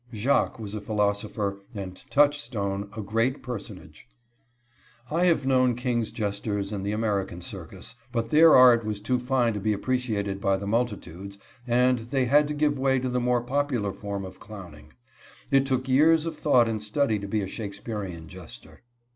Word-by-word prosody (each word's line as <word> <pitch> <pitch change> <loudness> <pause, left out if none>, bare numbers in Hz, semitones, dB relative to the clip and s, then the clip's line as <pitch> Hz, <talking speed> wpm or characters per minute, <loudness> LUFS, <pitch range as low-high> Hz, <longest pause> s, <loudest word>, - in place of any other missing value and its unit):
_" - - -6
Jacques 130 +5 +1
was 105 -3 -7
a 105 - -4
philosopher, 100 -1 -1 0.2
and 95 -2 -7
Touchstone 115 -9 +1
a 110 - -3
great 115 +6 0
personage. 125 -5 -8 1.0
I 170 +3 +2
have 165 -6 +2
known 130 -2 +3
king's 120 -2 -1
jesters 100 -1 -3
in 100 -2 -3
the 100 +1 -2
American 100 -5 -1
circus, 90 - -9 0.2
but 115 -1 -2
their 160 +1 +7
art 125 -2 +7
was 105 -1 -3
too 125 +4 0
fine 125 -2 +1
to 105 - -3
be 105 +2 0
appreciated 105 -4 -2
by 100 -1 +2
the 100 - -6
multitudes, 100 -4 -3 0.3
and 125 +1 +3
they 125 +3 -1
had 145 +4 +4
to 150 - -3
give 145 -2 +1
way 135 0 +2
to 130 0 -2
the 125 0 0
more 125 0 +1
popular 125 -5 -1
form 100 0 -5
of 95 0 -11
clowning. 85 -8 -12 0.6
It 135 0 +4
took 130 -1 -1
years 155 +4 +4
of 165 - -4
thought 125 -6 +3
and 110 -2 -2
study 110 +1 0
to 100 - -6
be 105 +1 -1
a 95 - -3
Shakespearian 100 -5 -6
jester. 90 -3 -12
115 Hz, 175 wpm, -26 LUFS, 100-130 Hz, 1.0 s, their